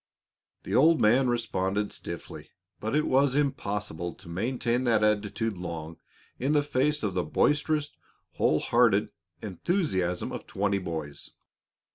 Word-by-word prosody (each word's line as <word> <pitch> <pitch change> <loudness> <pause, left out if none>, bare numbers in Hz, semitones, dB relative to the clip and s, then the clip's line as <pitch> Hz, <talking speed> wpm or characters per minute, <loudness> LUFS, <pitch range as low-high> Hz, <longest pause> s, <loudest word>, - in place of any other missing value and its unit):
The - - -5
old 160 +5 +5
man 125 +5 +4
responded 105 -4 -1
stiffly, - - -7 0.3
but 110 +6 -2
it 150 - +2
was 135 0 +3
impossible 105 - -2
to 95 - -15
maintain 120 +6 -1
that 110 -3 +3
attitude 105 -1 0
long 85 -2 -6 0.4
in 135 +4 +1
the 145 -1 +3
face 145 +1 0
of 100 -3 -1
the 90 -1 0
boisterous, 150 - +1 0.4
whole 75 - +2
hearted 110 -4 +3 0.3
enthusiasm 95 - -1
of - - -7
twenty 100 0 0
boys. 80 -5 -5
105 Hz, 130 wpm, -28 LUFS, 95-135 Hz, 0.4 s, old